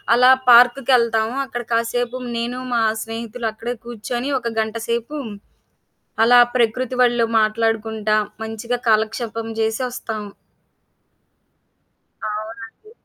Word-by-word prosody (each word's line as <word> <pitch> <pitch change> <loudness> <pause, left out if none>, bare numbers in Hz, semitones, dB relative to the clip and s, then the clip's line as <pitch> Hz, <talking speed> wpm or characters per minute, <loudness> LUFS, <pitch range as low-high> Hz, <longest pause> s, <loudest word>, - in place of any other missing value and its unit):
అలా 250 +2 +6 0.2
పార్క్‌కెళ్తాము. 240 -1 +4
అక్కడ 240 -2 -5
కాసేపు 235 +2 -1 0.2
నేను 240 +2 -3
మా 235 - +2 0.2
స్నేహితులు 225 +1 -5
అక్కడే 235 +3 -5
కూర్చొని 240 +3 -4
ఒక 235 -2 -4
గంటసేపు, 230 +5 -3 1.1
అలా 245 +2 +6 0.2
ప్రకృతి 250 +1 0
ఒళ్ళో 240 -1 +2
మాట్లాడుకుంటా 220 0 0 0.3
మంచిగా 230 +2 -3
కాలక్షేపం 225 +1 0
జేసి 220 +3 0
ఒస్తాం. 220 -3 -5 2.0
అవునండి. 225 - -7
230 Hz, 90 wpm, -20 LUFS, 220-245 Hz, 2.0 s, అలా